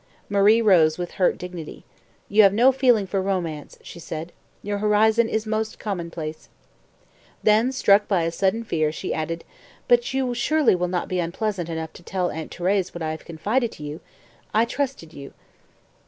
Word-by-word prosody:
Marie 205 +3 +4
rose 165 -7 +5
with 175 -1 -4
hurt 180 - +3
dignity. 180 -3 -8 0.4
"You 210 +2 +5
have 200 -1 +5
no 250 +4 +6
feeling 250 -6 +3
for 190 +1 -1
romance," 175 -6 -3
she - - -10
said. 165 +1 -6 0.3
"Your 205 0 -2
horizon 220 +2 +3
is 220 0 -1
most 215 0 -2
commonplace." 170 -6 -5 0.9
Then, 220 +4 +4
struck 205 -5 +4
by 185 -5 +1
a 165 - -1
sudden 195 +6 0
fear, 155 -8 0
she 155 - -4
added, 165 +1 -3 0.4
"But 240 0 +3
you 265 -2 -1
surely 295 +3 +2
will 180 0 0
not 180 0 -2
be 185 - -2
unpleasant 175 +1 -2
enough 160 -1 -5
to - - -13
tell 180 0 -2
Aunt 160 0 -6
Thérèse 185 +1 -1
what 170 - -5
I 155 - -1
have 155 - -8
confided 215 +9 -1
to 150 - -11
you? 150 +2 -6 0.6
I 225 +2 +4
trusted 255 - -4
you." 140 -1 -11
190 Hz, 175 wpm, -23 LUFS, 165-220 Hz, 0.9 s, no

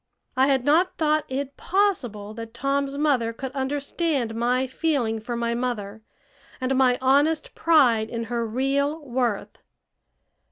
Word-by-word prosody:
I 265 +1 +4
had 265 -3 +1
not 335 +6 +3
thought 310 -2 +1
it 275 +1 -4
possible 245 - 0
that 230 +1 -9
Tom's 275 +2 -1
mother 270 -6 +1
could 255 +3 -6
understand 280 -1 -1
my 245 +3 +1
feeling 260 -5 -1
for 240 +2 -4
my 235 0 -1
mother 220 -4 -3 0.6
and 260 0 0
my 255 -1 +4
honest 285 +4 +2
pride 250 -10 +3
in 230 -1 -3
her 235 +1 -2
real 280 +6 -1
worth. 240 -5 -2
260 Hz, 135 wpm, -24 LUFS, 235-285 Hz, 0.6 s, I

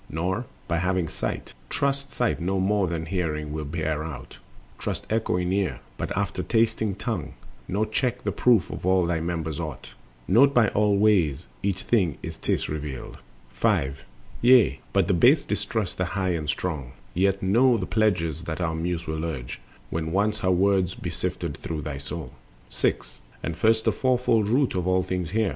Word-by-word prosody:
Nor, 95 - -2 0.2
having 90 +1 +1
sight, - - -4 0.2
Trust 140 -1 -1
sight 120 -7 0
no 95 +3 0
more 100 0 +2
than 80 -1 -3
hearing 80 -4 -2
will 75 -1 -3
bear 80 0 -2
out, 80 -4 -8 0.4
Trust - - -3
echoing 90 -5 +1
ear 100 -1 0 0.2
but - - -4
after - - -1
tasting 110 -3 +1
tongue; 100 - -4 0.3
Nor 105 +4 0
check 125 +3 -1
the - - 0
proof 115 -8 +3
of - - -6
all 95 -1 +3
thy 85 -1 0
members 80 -2 -3
aught: - - -6 0.4
Note 140 +8 +5
by 115 -4 +5
all 105 -1 +2
ways 90 -8 +3 0.2
each 100 -1 -1
thing 95 - +2
as - - -5
'tis - - -1
revealed. 75 -4 -5 0.3
5. 65 +3 0 0.4
Yea, 120 - +6
but - - +2
the - - +3
base - - +5
distrust 105 -6 -2
the 90 - +2
High 95 0 -1
and 80 -4 -1
Strong; 75 -8 -3 0.2
Yet 95 +2 +1
know 120 +6 +4
the 95 - -2
pledges 85 -8 +1
that 80 0 -4
our 85 -3 0
Muse 85 +1 -2
will 80 0 -3
urge, 65 -8 -4 0.3
When 80 0 -2
once 105 +4 +1
her 95 - +1
words 95 -1 +3
be - - -5
sifted - - -3
through 80 -2 -4
thy 75 -3 -4
soul. 70 0 -6 0.4
The - - +1
Elements. - - -3
6. - - -27 0.2
And 85 - -2
first 110 +4 +3
the 110 - +4
fourfold 120 -2 +2
root 130 +3 +2
of 90 -1 -1
all 95 0 +3
things 90 -2 -2
hear! 110 +1 +1
90 Hz, 180 wpm, -26 LUFS, 80-110 Hz, 0.4 s, Yea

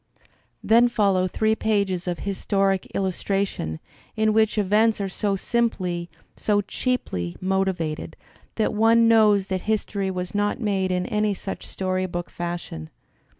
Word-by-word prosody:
Then 235 +2 +5
follow 195 -5 +2
three 220 +4 +1
pages 200 -5 0
of 175 -1 -2
historic 195 -1 0
illustration, 190 - -1 0.4
in 220 0 +2
which 220 0 +2
events 210 +2 +3
are 200 - -1
so 200 +1 -1
simply, 185 -6 -1 0.3
so 205 -1 +1
cheaply, 195 - -2
motived, 185 -5 -1 0.4
that 220 0 0
one 225 +2 +4
knows 210 -4 +4
that 185 -1 -1
history 205 -2 -1
was 180 0 -4
not 205 +2 0
made 195 -4 0
in 180 0 0
any 210 -3 0
such 195 - -6
story 185 0 -2
book 175 0 -5
fashion. 170 - -5
195 Hz, 135 wpm, -24 LUFS, 185-215 Hz, 0.4 s, Then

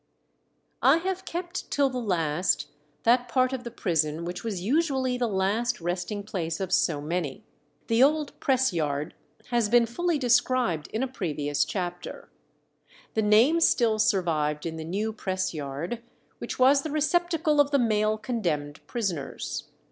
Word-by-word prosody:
I - - +6
have 380 +2 -3
kept 345 +1 -5
till 280 -1 +2
the 255 - -3
last 175 -3 0 0.3
that 245 +1 +3
part 255 +1 +2
of 255 -2 -4
the 240 - -5
prison 165 -6 -1
which 180 +1 -5
was 215 -5 -3
usually 265 - +1
the 245 -1 0
last 215 +5 0
resting 180 +4 -3
place 170 -5 -3
of 190 -1 -2
so 150 -6 +2
many. 155 -2 -3 0.4
The 230 +1 +2
old 300 +2 +2
press 260 -5 +2
yard 150 -3 -2 0.4
has 235 -3 +1
been 240 +1 +5
fully 335 +8 -1
described 245 - +2
in 220 +4 -2
a - - 0
previous 150 - -1
chapter. 175 0 -5 0.8
The 220 - +1
name 225 +10 +5
still 230 -9 +3
survived 165 -9 +1
in 160 -1 -4
the 160 - -5
new 205 +7 -2
press 185 -4 -2
yard, 155 +9 -4 0.4
which - - -5
was 270 +2 +5
the 310 - -5
receptacle 310 0 +2
of 285 - +1
the 285 - +3
male 215 -3 +2
condemned 165 - -2
prisoners. 185 - -3
215 Hz, 155 wpm, -27 LUFS, 170-255 Hz, 0.8 s, I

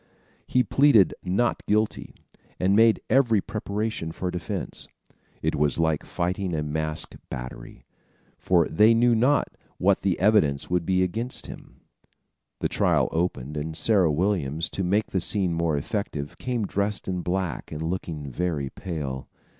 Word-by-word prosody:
He 125 - +3
plead 135 -9 +5
not 100 +6 0
guilty 105 +1 0 0.4
and 95 +2 +3
made 115 0 +5
every 120 -5 +4
preparation 105 -4 -3
for 90 +2 -3
defense. 90 -2 -4 0.6
It - - +1
was 75 -1 +1
like 80 -2 +1
fighting 90 0 -2
a 75 - -1
masked 80 +1 -3
battery; 60 -1 -8 0.5
for 85 -3 +3
they 110 +7 +5
knew 120 +1 +4
not 125 +6 +3 0.3
what 100 +1 +2
the 95 -3 0
evidence 90 -10 +2
would 90 -2 0
be 95 -1 +3
against 115 +8 -2
them. - - -12 0.8
The - - +2
trial - - +2
opened, 75 -4 -2
and 80 +1 -4
Sarah 95 -4 +3
Williams, 80 -2 0
to 95 - -2
make 100 +4 +2
the 95 - 0
scene 95 -1 +2
more 85 -2 0
effective, 75 -3 -4
came 120 -4 -1
dressed 100 +2 -2
in 90 -1 -2
black 90 -1 -3
and 75 +1 -4
looking 80 -4 -4
very 75 -3 -2
pale. 70 -7 -5
90 Hz, 145 wpm, -25 LUFS, 80-105 Hz, 0.8 s, plead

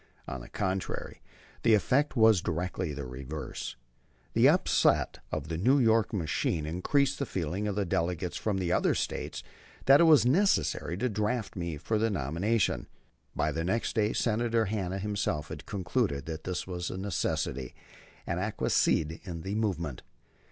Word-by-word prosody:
On 65 - -5
the - - -11
contrary, 95 0 -3 0.4
the 115 -2 +5
effect 140 +8 +1
was 110 -5 +5
directly 90 0 -2
the 70 -2 -5
reverse. 65 +4 -6 0.6
The - - +6
upset - - +2
of 75 -1 -3
the 80 0 -3
New 130 +9 +4
York 115 -4 +3
machine 80 -4 -1
increased 130 - +1
the 140 - 0
feeling 95 +3 -2
of 100 - -2
the 100 -1 0
delegates 85 -1 -1
from 105 -3 -1
other - - +2
States - - -3 0.4
that 135 +2 +7
it - - +7
was 155 -6 +6
necessary 145 - +2
to 125 - 0
draft 105 +1 -2
me 85 -4 -3
for 105 +8 -1
the 115 +1 +2
nomination. 95 - 0 0.5
By - - +1
next 90 +8 -1
day 105 -1 +2
Senator 115 0 +1
Hanna 95 -3 -2
himself 95 -6 -2 0.2
concluded 95 - -1
that 80 -1 -6
this 90 -1 -2
was 90 -1 -4
a - - -5
necessity, 95 -9 -2 0.5
and - - -2
acquiesced - - +1 0.4
in 85 -2 -5
the 95 - -3
movement. 85 - -2
95 Hz, 150 wpm, -29 LUFS, 85-110 Hz, 0.6 s, that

